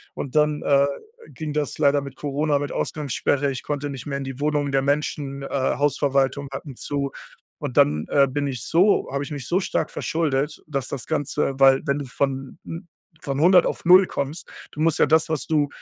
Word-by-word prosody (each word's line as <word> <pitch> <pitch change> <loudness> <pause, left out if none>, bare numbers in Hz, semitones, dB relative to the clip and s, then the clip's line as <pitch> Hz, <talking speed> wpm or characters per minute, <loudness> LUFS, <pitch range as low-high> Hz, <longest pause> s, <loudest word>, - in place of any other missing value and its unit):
Und 135 -1 -6
dann, 150 -1 +2
äh, 140 0 +4 0.5
ging 155 -2 -5
das 150 -2 -2
leider 145 -1 +3
mit 140 -1 -9
Corona 145 +1 0
mit 145 0 -3
Ausgangssperre, 145 -1 -1
ich 130 - -5
konnte 145 0 -3
nicht 135 -2 -7
mehr 140 -1 -2
in 140 - -4
die 135 0 -7
Wohnungen 145 -1 0
der 135 -1 +2
Menschen, 140 -1 -1
äh, - - -5
Hausverwaltungen 140 0 0
hatten 135 0 -7
zu. 140 -1 -3 0.5
Und - - -5
dann, 75 +1 +4
äh, 140 -1 +4
bin 145 +2 -2
ich 130 -5 -3
so 185 +5 +3
habe 140 +1 -2
ich 150 - -8
mich 140 -4 -5
so 180 - +2
stark 195 - -1
verschuldet, 150 -2 -1
dass 140 -4 -3
das 135 - -5
Ganze, 150 -2 -1
weil 135 0 +6
wenn 140 - +1
du 140 - -5
von 135 +1 -3
'n 165 +1 -7 0.3
von 140 -1 -3
100 180 +3 +6
auf - - -3
0 185 +2 +7
kommst 140 +2 -4 0.2
du 150 - -11
musst 160 0 +2
ja - - +5
das, 160 0 +3
was 160 -3 -2
du 150 -2 +2
140 Hz, 205 wpm, -23 LUFS, 135-150 Hz, 0.5 s, 0